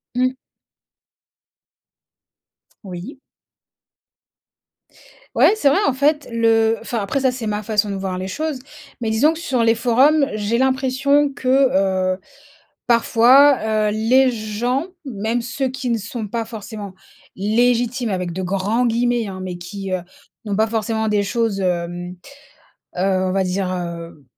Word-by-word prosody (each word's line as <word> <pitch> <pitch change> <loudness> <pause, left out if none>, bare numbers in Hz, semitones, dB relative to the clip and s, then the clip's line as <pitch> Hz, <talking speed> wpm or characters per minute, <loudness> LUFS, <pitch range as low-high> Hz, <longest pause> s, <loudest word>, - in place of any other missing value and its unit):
Mmh. 255 +1 +1 2.5
Oui. 190 - -8 2.2
Ouais, - - +5
c'est 360 -10 +1
vrai. 320 - +3
En 275 - +2
fait, 290 +3 +1
le 225 -1 +2
enfin, 230 0 -3
après, 205 +7 -1
ça, 260 -1 +3
c'est 245 -3 -5
ma 210 0 -2
façon 210 0 0
de 200 - -3
voir 190 -1 -3
les 185 - -4
choses, 300 +7 -3 0.4
mais 225 - -1
disons 265 +9 +3
que, 325 - -8
sur 260 -8 0
les 225 0 +4
forums, 260 +6 +3
j'ai 215 +3 -1
l'impression 265 +2 +2
que, 195 -9 +2
heu, - - -17 0.7
parfois, 235 -2 +4
heu, - - -1
les 250 +5 +3
gens 240 - -2 0.2
même 230 -1 -2
ceux 260 +2 -2
qui 260 -1 -3
ne 230 - 0
sont 220 +1 -5
pas 230 +2 -3
forcément 210 -3 -8 0.4
légitimes 240 +3 +1
avec 180 -2 -2
de 190 - -4
grands 200 +6 0
guillemets, 240 0 0
hein, 190 -1 -7
mais 180 -1 -5
qui, 195 +2 -7
heu, 185 - 0 0.5
n'ont 205 - -2
pas 220 +2 +3
forcément 220 0 -1
des 210 -1 +2
choses, 220 -1 -1
hem, 175 0 -2 0.8
heu, - - 0
on 185 0 +1
va 190 0 +1
dire, 185 0 -2
heu, 170 -4 -6
225 Hz, 145 wpm, -20 LUFS, 195-255 Hz, 2.5 s, Ouais